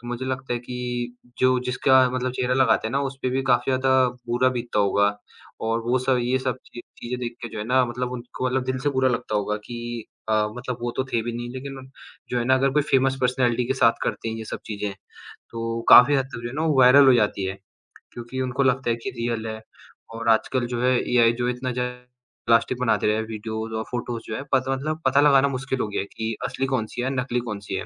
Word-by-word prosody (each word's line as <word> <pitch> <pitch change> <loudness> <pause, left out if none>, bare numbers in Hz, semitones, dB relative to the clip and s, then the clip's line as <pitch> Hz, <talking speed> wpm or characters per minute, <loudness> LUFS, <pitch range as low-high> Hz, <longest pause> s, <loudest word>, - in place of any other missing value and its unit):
तो 120 - -12
मुझे 120 +1 -4
लगता 130 -1 -3
है - - -2
कि 125 0 -4 0.2
जो 130 0 +4
जिसका 130 +1 +4
मतलब 130 0 -2
चेहरा 125 0 0
लगाते 130 -4 +3
हैं - - -7
ना 140 - +1
उसपे 135 -1 -3
भी 135 +1 0
काफ़ी 130 0 +2
ज़्यादा 130 0 +3 0.2
बुरा 120 +2 +3
बीतता 120 -3 -2
होगा 100 0 +3 0.6
और 115 +1 0
वो 120 +3 +1
सब 130 0 +1
ये 125 +2 +1
सब 130 -1 -2 0.2
ची 120 - -7 0.2
चीज़ें 125 +1 -5
देख 120 -1 -4
के 120 - -4
जो - - -8
है 105 - -3
ना 130 +3 +3
मतलब 125 +1 -4
उनको 125 +1 -5
मतलब 130 0 0
दिल 130 0 -2
से 145 - 0
बुरा 130 -1 +2
लगता 115 -2 -3
होगा 105 +1 -1
कि 120 -1 -6 0.3
अ, - - +2 0.2
मतलब 125 0 -4
वो 120 - -1
तो 130 - 0
थे 115 - +2
भी 120 +1 -4
नहीं 120 +1 -5
लेकिन 130 0 -8 0.4
जो 125 - 0
है 120 - -1
ना, 130 +2 +4
अगर 135 +1 +2
कोई 150 +1 +3
फेमस 135 0 +3
पर्सनैलिटी 125 -1 +1
के 130 - 0
साथ 115 -3 +4
करते - - -2
हैं 110 - -4
ये 110 - -6
सब - - -5
चीज़ें, 105 -1 -4 0.6
तो 115 0 -3
काफ़ी 140 +4 +9
हद 135 - +1
तक 135 -3 -8
जो 120 - -4
है 120 - -8
ना 155 - -2
वो 150 -4 +2
वायरल 130 +2 +8
हो 130 - +8
जाती 105 -4 +1
है। 95 +1 -4 0.5
क्योंकि 120 +2 -6
उनको 130 +2 0
लगता 130 -1 +1
है - - +1
कि 115 +3 -6
रियल 115 -1 -2
है 110 0 -5 0.6
और 115 0 -2
आजकल 120 +3 +2
जो 120 - -2
है 125 - +4 0.2
एआई 115 -1 +5
जो 120 - +1
इतना 125 +1 -3
ज़्यादा 125 0 -3 0.5
प्लास्टिक 115 +2 +3
बनाते 120 -3 +2
रहे 105 - +3
हैं, 110 - -1
वीडियोज़ 110 0 -5
और 110 - -2
फ़ोटोज़ 120 -1 -4
जो 110 - -4
हैं, 140 - -4
पत 130 -1 +3
मतलब 155 +4 -2
पता 135 +2 +4
लगाना 140 -2 +5
मुश्किल 130 0 -3
हो - - -1
गया 105 - -2
है 100 - -6
कि 110 0 -2
असली 135 - -2
कौन-सी 115 0 -3
है, 130 - -1
नकली 125 -1 -2
कौन-सी 100 -2 -5
है? - - -3
125 Hz, 245 wpm, -24 LUFS, 115-130 Hz, 0.6 s, काफ़ी